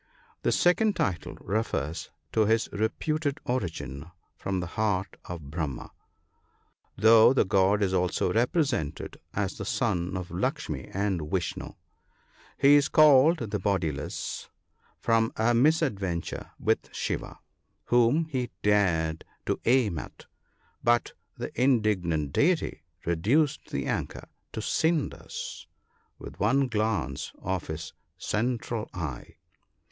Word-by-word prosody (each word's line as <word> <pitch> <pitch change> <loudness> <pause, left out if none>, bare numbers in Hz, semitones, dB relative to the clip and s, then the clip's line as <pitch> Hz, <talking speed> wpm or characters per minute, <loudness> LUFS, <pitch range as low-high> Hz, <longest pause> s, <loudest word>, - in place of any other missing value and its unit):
The - - +1
second 205 +4 +3
title 85 -7 -2
refers 90 -8 -2 0.2
to 110 -2 +3
his 115 +1 +2
reputed 145 +7 -1
origin 80 - -3 0.3
from 95 -1 -2
the 90 - -2
heart 100 -3 0
of 80 -5 -7
Brahma, 75 -6 -4 1.1
though 110 +3 +7
the 135 - +3
god 100 +1 +3
is 95 -1 0
also 90 0 +1
represented 120 - 0 0.2
as - - -2
the - - -3
son 90 +2 -1
of 90 -1 -5
Lukshmi 85 - -2
and 95 -6 -1
Vishnoo. 90 -4 -3 0.8
He 140 +1 +6
is 145 +1 +5
called 150 - +5
the 105 - -1
Bodiless, 90 -8 -2 0.5
from 115 -1 +2
a 115 +2 +3
misadventure 115 - +1
with - - 0
Shiva, - - -3 0.5
whom 120 +7 +3
he 130 -6 -2
dared 85 -6 +2 0.2
to - - -1
aim 115 - +3
at, - - -10 0.6
but 120 0 +2 0.2
the - - -5
indig 110 -7 +2
nant 75 -4 -1
deity 170 +2 +1 0.2
reduced 125 - +1
the - - -3
archer - - -3 0.3
to - - -4
cinders 160 -2 -2 0.5
with - - -10
one 135 0 +3
glance 105 - -1
of 95 -2 -3
his 80 0 -6 0.2
central 115 +1 -2
eye. 80 -8 -5
105 Hz, 120 wpm, -28 LUFS, 90-125 Hz, 1.1 s, though